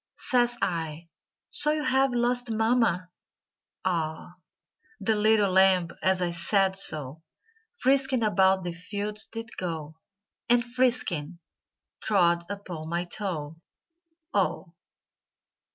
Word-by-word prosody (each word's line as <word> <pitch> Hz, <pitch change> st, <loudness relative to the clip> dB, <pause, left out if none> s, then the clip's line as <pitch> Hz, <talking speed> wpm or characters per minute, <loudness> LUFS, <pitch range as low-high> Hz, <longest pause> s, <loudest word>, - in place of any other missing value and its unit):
Says 240 Hz, -1 st, +1 dB
I, 165 Hz, -3 st, -3 dB, 0.4 s
"So 300 Hz, +1 st, +4 dB
you 305 Hz, -1 st, -2 dB
have 265 Hz, 0 st, +2 dB
lost 245 Hz, 0 st, 0 dB
mama?" 220 Hz, -5 st, +1 dB, 0.7 s
"Ah!" 170 Hz, 0 st, -3 dB, 0.6 s
The 215 Hz, +2 st, +1 dB
little 210 Hz, -2 st, +3 dB
lamb, 190 Hz, -2 st, +4 dB
as 185 Hz, -1 st, +1 dB
I 175 Hz, -, -1 dB
said 190 Hz, +3 st, +1 dB
so, 155 Hz, -5 st, +2 dB, 0.6 s
Frisking 265 Hz, -, +2 dB
about 190 Hz, -3 st, +3 dB
the 175 Hz, -1 st, -4 dB
fields 205 Hz, +4 st, -4 dB
did 230 Hz, 0 st, -8 dB
go, 160 Hz, -3 st, -5 dB, 0.5 s
And 240 Hz, 0 st, +3 dB
frisking, 235 Hz, -, 0 dB, 0.6 s
trod 170 Hz, -4 st, +2 dB
upon 180 Hz, -6 st, -7 dB
my 170 Hz, +1 st, -1 dB
toe, 165 Hz, -6 st, -4 dB, 0.8 s
"Oh!" -, -, -1 dB
195 Hz, 105 wpm, -26 LUFS, 170-235 Hz, 0.8 s, So